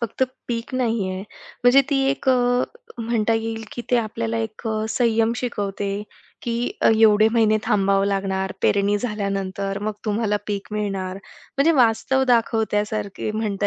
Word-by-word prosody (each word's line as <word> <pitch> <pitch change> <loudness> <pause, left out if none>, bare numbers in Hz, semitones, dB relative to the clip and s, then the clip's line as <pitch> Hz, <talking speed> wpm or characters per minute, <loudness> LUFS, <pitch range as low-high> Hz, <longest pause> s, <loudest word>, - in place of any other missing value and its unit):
फक्त 235 +2 -2 0.3
पीक 235 +2 -3
नाही 230 -6 0
आहे. 185 0 -4 0.4
म्हणजे 245 +3 +7
ती 280 - +2
एक 275 -1 -3
अ, 260 - +6 0.6
म्हणता 230 -1 +1
येईल 225 0 -3
की 240 - -5
ते 245 - +4
आपल्याला 115 - -2
एक 115 - -5
अ, 215 0 -1
संयम 230 -1 +2
शिकवते 205 -4 -3 0.4
की 235 - -2 0.3
एवढे 220 -1 +5
महिने 220 -2 +4
थांबावं 200 -3 +2
लागणार, 190 -1 -1
पेरणी 200 +1 +3
झाल्यानंतर, 200 -3 -3
मग 215 0 -1
तुम्हाला 210 -1 0
पीक 200 -1 -4
मिळणार 195 -3 -2
म्हणजे 275 +9 -1
वास्तव 245 +3 +3
दाखवत्यासारखे 215 -3 0
म्हणता 210 -2 -1
215 Hz, 140 wpm, -22 LUFS, 200-230 Hz, 0.6 s, म्हणजे